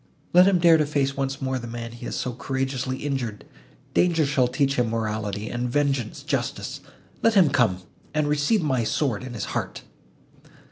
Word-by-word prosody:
Let 180 Hz, +2 st, +7 dB
him 195 Hz, -2 st, +4 dB
dare 170 Hz, -2 st, +6 dB
to 155 Hz, -, +2 dB
face 140 Hz, -2 st, 0 dB
once 135 Hz, 0 st, -3 dB
more 130 Hz, -1 st, -1 dB
the 120 Hz, -, -7 dB
man 115 Hz, 0 st, -6 dB
he 120 Hz, +1 st, -9 dB
has -, -, -4 dB
so 125 Hz, -, -2 dB
courageously 130 Hz, +1 st, -2 dB
injured; 130 Hz, -8 st, -3 dB, 0.5 s
danger 165 Hz, -3 st, +3 dB
shall 135 Hz, -3 st, +2 dB
teach 140 Hz, +2 st, +1 dB
him 120 Hz, -2 st, +2 dB
morality, 110 Hz, -2 st, -2 dB
and 120 Hz, +1 st, -2 dB
vengeance 135 Hz, -4 st, -1 dB
justice—let 225 Hz, -1 st, -3 dB
him 175 Hz, -8 st, +6 dB
come, 110 Hz, -10 st, +2 dB, 0.3 s
and 155 Hz, -1 st, 0 dB
receive 150 Hz, +7 st, +2 dB
my 130 Hz, -5 st, +1 dB
sword 115 Hz, -1 st, 0 dB
in 125 Hz, -2 st, -7 dB
his 105 Hz, -, -3 dB
heart!" -, -, -3 dB
135 Hz, 175 wpm, -25 LUFS, 120-145 Hz, 0.5 s, Let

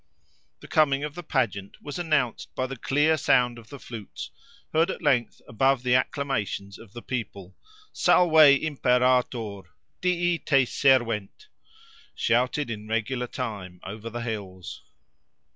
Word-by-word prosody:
The -, -, -11 dB
coming 145 Hz, -3 st, +2 dB
of 150 Hz, -1 st, -4 dB
the 175 Hz, -, -7 dB
pageant 115 Hz, -, -2 dB
was 145 Hz, +3 st, -7 dB
announced 150 Hz, -9 st, -1 dB
by 130 Hz, -, -1 dB
the 135 Hz, +1 st, -6 dB
clear 145 Hz, +5 st, +2 dB
sound 125 Hz, -4 st, +2 dB
of 110 Hz, -, -16 dB
the 140 Hz, -, -9 dB
flutes, 115 Hz, -6 st, -9 dB, 0.4 s
heard 165 Hz, +3 st, +3 dB
at 190 Hz, -, -5 dB
length 130 Hz, -6 st, +1 dB
above 135 Hz, +2 st, +1 dB
the 125 Hz, -1 st, +2 dB
acclamations 125 Hz, -7 st, -1 dB
of 110 Hz, -3 st, -15 dB
the 120 Hz, -, -9 dB
people—Salve 155 Hz, -, -1 dB, 0.3 s
Imperator!—Dii 125 Hz, -, 0 dB
te 135 Hz, -3 st, +3 dB
servent!—shouted 130 Hz, -, -1 dB
in 105 Hz, -1 st, -7 dB
regular 120 Hz, +3 st, -2 dB
time, 100 Hz, -9 st, -6 dB
over 110 Hz, +4 st, -7 dB
the 120 Hz, +1 st, -5 dB
hills. 100 Hz, -6 st, -6 dB
125 Hz, 125 wpm, -26 LUFS, 110-145 Hz, 0.4 s, heard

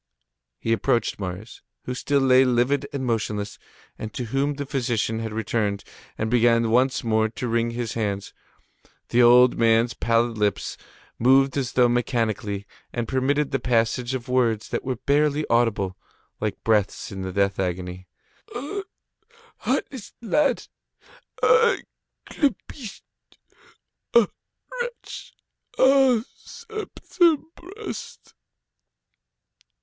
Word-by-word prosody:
He 115 Hz, -, 0 dB
approached 115 Hz, +1 st, 0 dB
Marius, 95 Hz, +3 st, -6 dB, 0.2 s
who 125 Hz, -, -4 dB
still 140 Hz, +2 st, 0 dB
lay 130 Hz, 0 st, +6 dB
livid 130 Hz, +3 st, +1 dB
and 140 Hz, -3 st, -3 dB
motionless, 105 Hz, -3 st, -2 dB, 0.4 s
and 110 Hz, -, -5 dB
to 125 Hz, -, -2 dB
whom 140 Hz, +2 st, +1 dB
the 145 Hz, 0 st, -4 dB
physician 120 Hz, -5 st, -1 dB
had 115 Hz, -1 st, -4 dB
returned, 105 Hz, -2 st, -1 dB, 0.3 s
and 110 Hz, -, -1 dB
began 115 Hz, -1 st, +3 dB
once 130 Hz, +3 st, +2 dB
more 110 Hz, -1 st, +2 dB
to 125 Hz, +3 st, -5 dB
wring 115 Hz, 0 st, +1 dB
his 115 Hz, -1 st, -4 dB
hands. 100 Hz, -3 st, -3 dB, 0.8 s
The 120 Hz, -, +4 dB
old 125 Hz, +1 st, +6 dB
man's 115 Hz, +1 st, +3 dB
pallid 115 Hz, -1 st, +1 dB
lips 105 Hz, -2 st, 0 dB, 0.4 s
moved 135 Hz, +2 st, +4 dB
as 135 Hz, -3 st, -2 dB
though 125 Hz, -1 st, +5 dB
mechanically, 115 Hz, -4 st, -1 dB, 0.3 s
and 120 Hz, -2 st, -3 dB
permitted 135 Hz, +3 st, 0 dB
the 135 Hz, -, 0 dB
passage 120 Hz, +1 st, 0 dB
of 125 Hz, 0 st, -6 dB
words 120 Hz, -4 st, +1 dB
that -, -, -2 dB
were 130 Hz, -1 st, -2 dB
barely 145 Hz, +4 st, +1 dB
audible, 110 Hz, -6 st, +1 dB, 0.4 s
like 110 Hz, -1 st, -3 dB
breaths 105 Hz, -3 st, +1 dB
in 95 Hz, -1 st, -6 dB
the 95 Hz, 0 st, -4 dB
death 100 Hz, +1 st, 0 dB
agony: 90 Hz, 0 st, -3 dB, 0.5 s
"Ah! 290 Hz, +12 st, -4 dB, 0.8 s
heartless 245 Hz, -7 st, -3 dB
lad! 270 Hz, +3 st, +1 dB, 0.8 s
Ah! 470 Hz, 0 st, +5 dB, 0.5 s
clubbist! 275 Hz, -6 st, -3 dB, 1.1 s
Ah! 235 Hz, -3 st, +6 dB, 0.5 s
wretch! 485 Hz, 0 st, -7 dB, 0.4 s
Ah! 265 Hz, -3 st, +5 dB, 0.2 s
Septembrist!" 370 Hz, -2 st, -3 dB
120 Hz, 115 wpm, -24 LUFS, 110-140 Hz, 1.1 s, lay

